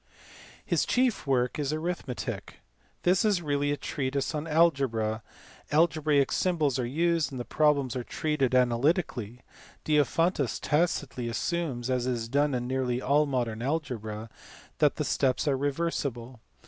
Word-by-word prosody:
His -, -, +1 dB
chief 250 Hz, -, +1 dB
work 125 Hz, +1 st, +1 dB
is 145 Hz, -, -1 dB
his 145 Hz, -, -1 dB
Arithmetic. 155 Hz, -5 st, -4 dB, 0.4 s
This 180 Hz, +1 st, +3 dB
is 205 Hz, -5 st, +2 dB
really 145 Hz, -1 st, 0 dB
a 145 Hz, -, -1 dB
treatise 140 Hz, +2 st, -2 dB
on 150 Hz, +1 st, -3 dB
algebra; 135 Hz, -9 st, +2 dB, 0.5 s
algebraic 150 Hz, -3 st, +3 dB
symbols 155 Hz, -8 st, +1 dB
are 120 Hz, -, -1 dB
used, 165 Hz, +3 st, +1 dB
and 130 Hz, -, -6 dB
the 120 Hz, -, -4 dB
problems 145 Hz, -5 st, +2 dB
are 125 Hz, -, -2 dB
treated 140 Hz, -2 st, 0 dB
analytically. 125 Hz, -, +1 dB, 0.4 s
Diophantus 150 Hz, 0 st, +1 dB
tacitly 145 Hz, -5 st, 0 dB
assumes, 130 Hz, 0 st, -2 dB
as 125 Hz, -1 st, 0 dB
is 120 Hz, -3 st, -1 dB
done 140 Hz, +2 st, +1 dB
in 120 Hz, 0 st, -2 dB
nearly 130 Hz, -1 st, -1 dB
all 145 Hz, +3 st, +2 dB
modern 120 Hz, -5 st, -2 dB
algebra, 115 Hz, -7 st, -3 dB, 0.5 s
that -, -, +4 dB
the -, -, -2 dB
steps 130 Hz, +3 st, +1 dB
are 140 Hz, -, +3 dB
reversible. 135 Hz, -4 st, -2 dB
140 Hz, 140 wpm, -28 LUFS, 125-155 Hz, 0.5 s, that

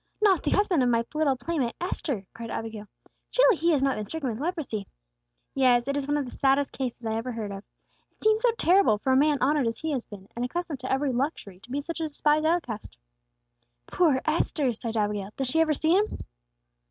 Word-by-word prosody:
"Not 405 Hz, -4 st, +4 dB
the -, -, -1 dB
husband 395 Hz, -7 st, +2 dB
of 250 Hz, -, +3 dB
my 230 Hz, -1 st, +2 dB
little 305 Hz, -3 st, +2 dB
playmate 260 Hz, -2 st, -2 dB
Esther!" 280 Hz, -, -3 dB
cried 230 Hz, 0 st, -7 dB
Abigail. 220 Hz, -2 st, -5 dB, 0.4 s
"Surely -, -, +5 dB
he 335 Hz, +1 st, +1 dB
has 290 Hz, -5 st, +3 dB
not 270 Hz, -1 st, +1 dB
been 215 Hz, -, -3 dB
stricken 285 Hz, +3 st, -3 dB
with 220 Hz, -, -6 dB
leprosy!" 290 Hz, -, -3 dB, 0.7 s
"Yes; 250 Hz, -2 st, +3 dB
it 280 Hz, -, 0 dB
is 280 Hz, -1 st, -2 dB
one 290 Hz, 0 st, +1 dB
of 285 Hz, -, -1 dB
the 245 Hz, -, -8 dB
saddest 275 Hz, +1 st, +2 dB
cases 245 Hz, -3 st, -5 dB
I 220 Hz, -, -1 dB
ever 230 Hz, +3 st, -3 dB
heard 220 Hz, -3 st, -4 dB
of. 195 Hz, 0 st, -7 dB, 0.5 s
It -, -, -21 dB
seems 435 Hz, 0 st, +3 dB
so -, -, +4 dB
terrible 360 Hz, -, +4 dB
for 260 Hz, +5 st, +1 dB
a -, -, +4 dB
man 295 Hz, +2 st, +4 dB
honored 280 Hz, -1 st, +2 dB
as 230 Hz, -, -2 dB
he 320 Hz, -, -3 dB
has 260 Hz, -5 st, -2 dB
been, 200 Hz, -2 st, -11 dB
and 240 Hz, -, -2 dB
accustomed 320 Hz, +2 st, -3 dB
to 255 Hz, -, -5 dB
every 270 Hz, +1 st, +1 dB
luxury, 245 Hz, -, -3 dB
to 230 Hz, -, -18 dB
be 280 Hz, +3 st, -2 dB
such 330 Hz, +3 st, -5 dB
a 320 Hz, -, 0 dB
despised 300 Hz, +1 st, +2 dB
outcast." 305 Hz, -11 st, -2 dB, 0.9 s
"Poor 300 Hz, -7 st, +2 dB
Esther!" 305 Hz, -4 st, +1 dB
sighed 225 Hz, +1 st, -5 dB
Abigail. 205 Hz, -2 st, -1 dB
"Does 270 Hz, -2 st, -2 dB
she 320 Hz, +4 st, +2 dB
ever 310 Hz, -2 st, +2 dB
see 315 Hz, +3 st, +1 dB
him?" 420 Hz, +2 st, +1 dB
270 Hz, 220 wpm, -27 LUFS, 230-315 Hz, 0.9 s, Surely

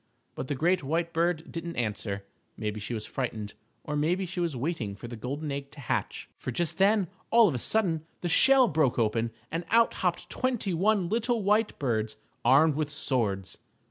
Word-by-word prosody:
But -, -, -5 dB
the 145 Hz, -, -1 dB
great 175 Hz, +6 st, +2 dB
white 165 Hz, +4 st, -1 dB
bird 170 Hz, 0 st, 0 dB
didn't 170 Hz, 0 st, -5 dB
answer. 105 Hz, -3 st, -3 dB, 0.3 s
Maybe 105 Hz, -1 st, -3 dB
she 115 Hz, +3 st, -4 dB
was 110 Hz, -, -4 dB
frightened, 110 Hz, -5 st, -4 dB, 0.3 s
or 150 Hz, -, -3 dB
maybe 170 Hz, +6 st, +1 dB
she 180 Hz, 0 st, -5 dB
was 170 Hz, -5 st, 0 dB
waiting 125 Hz, -, -2 dB
for 110 Hz, -, -9 dB
the 120 Hz, -, -7 dB
golden 140 Hz, +6 st, -4 dB
egg 140 Hz, 0 st, -4 dB
to 150 Hz, -, -12 dB
hatch, 135 Hz, -, -2 dB
for -, -, -5 dB
just 170 Hz, +8 st, -2 dB
then, 200 Hz, -1 st, +4 dB, 0.2 s
all 230 Hz, -1 st, +6 dB
of 165 Hz, -, 0 dB
a 125 Hz, -, -2 dB
sudden, 165 Hz, -, +1 dB
the 175 Hz, -, -1 dB
shell 260 Hz, +8 st, +6 dB
broke 155 Hz, -, +2 dB
open 115 Hz, 0 st, +1 dB, 0.2 s
and 165 Hz, +2 st, -2 dB
out 230 Hz, +1 st, +4 dB
hopped 180 Hz, -2 st, -1 dB
twenty 245 Hz, -7 st, -1 dB
one 195 Hz, +1 st, +2 dB
little 230 Hz, +2 st, 0 dB
white 210 Hz, +2 st, +2 dB
birds 110 Hz, -5 st, -1 dB, 0.3 s
armed 140 Hz, +6 st, +5 dB
with 150 Hz, 0 st, -1 dB
swords. 115 Hz, -10 st, -1 dB
155 Hz, 190 wpm, -28 LUFS, 120-180 Hz, 0.3 s, all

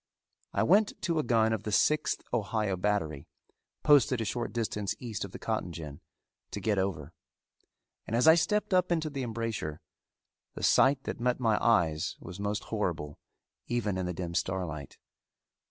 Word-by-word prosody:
I -, -, +1 dB
went 205 Hz, +4 st, +3 dB
to 170 Hz, -3 st, +1 dB
a -, -, +1 dB
gun 110 Hz, -3 st, +3 dB
of 110 Hz, -, -2 dB
the 105 Hz, -, -4 dB
Sixth 150 Hz, +8 st, +2 dB
Ohio 105 Hz, -3 st, 0 dB
battery, 90 Hz, -7 st, -1 dB, 0.6 s
posted 140 Hz, -4 st, +5 dB
a 110 Hz, -, -1 dB
short 120 Hz, +3 st, -2 dB
distance 105 Hz, -4 st, -2 dB
east 115 Hz, -6 st, -5 dB
of 100 Hz, -, -7 dB
the -, -, -7 dB
cotton 110 Hz, -5 st, -2 dB
gin, 75 Hz, -4 st, -8 dB, 0.5 s
to -, -, -5 dB
get 100 Hz, 0 st, +1 dB
over; 85 Hz, -5 st, -3 dB, 0.9 s
and 110 Hz, -, -1 dB
as 125 Hz, +6 st, +3 dB
I 160 Hz, -, +10 dB
stepped 205 Hz, +5 st, +1 dB
up 180 Hz, -1 st, +3 dB
into 160 Hz, -2 st, 0 dB
the 140 Hz, -1 st, -4 dB
embrasure, 115 Hz, -10 st, -3 dB, 0.8 s
the -, -, -7 dB
sight 135 Hz, 0 st, +4 dB
that -, -, -5 dB
met 125 Hz, +1 st, +1 dB
my 110 Hz, -4 st, +1 dB
eyes 85 Hz, -9 st, +2 dB
was 90 Hz, -, -9 dB
most 100 Hz, +1 st, -2 dB
horrible 85 Hz, -9 st, -3 dB, 0.5 s
even 115 Hz, -5 st, -1 dB
in 95 Hz, -1 st, -2 dB
the 90 Hz, -, -2 dB
dim 85 Hz, -1 st, -4 dB
starlight. 85 Hz, -6 st, -3 dB
105 Hz, 170 wpm, -30 LUFS, 90-125 Hz, 0.9 s, I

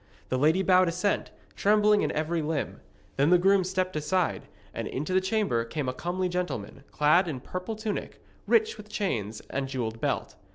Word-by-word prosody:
The 130 Hz, -, 0 dB
lady 160 Hz, +7 st, +3 dB
bowed 185 Hz, -1 st, +5 dB
assent, 180 Hz, +4 st, 0 dB, 0.3 s
trembling 210 Hz, 0 st, +4 dB
in -, -, 0 dB
every 160 Hz, +2 st, -1 dB
limb. 155 Hz, -1 st, -3 dB, 0.4 s
Then 140 Hz, +3 st, +4 dB
the 180 Hz, -, +7 dB
groom 195 Hz, +2 st, +4 dB
stepped 185 Hz, 0 st, -1 dB
aside, 160 Hz, +4 st, 0 dB, 0.3 s
and -, -, -4 dB
into 150 Hz, +8 st, -3 dB
the 185 Hz, -, +4 dB
chamber 190 Hz, -, +1 dB
came 135 Hz, +4 st, -4 dB
a 130 Hz, -, -1 dB
comely 180 Hz, +6 st, -2 dB
gentleman, 175 Hz, -, -4 dB
clad 155 Hz, +5 st, +3 dB
in 145 Hz, -6 st, -3 dB
purple 185 Hz, -, -5 dB
tunic, 215 Hz, -1 st, -4 dB, 0.3 s
rich 445 Hz, 0 st, +3 dB
with 210 Hz, -, -11 dB
chains 110 Hz, -, -2 dB
and 135 Hz, 0 st, -2 dB
jewelled 115 Hz, -4 st, -4 dB
belt. -, -, -1 dB
180 Hz, 175 wpm, -28 LUFS, 140-190 Hz, 0.4 s, the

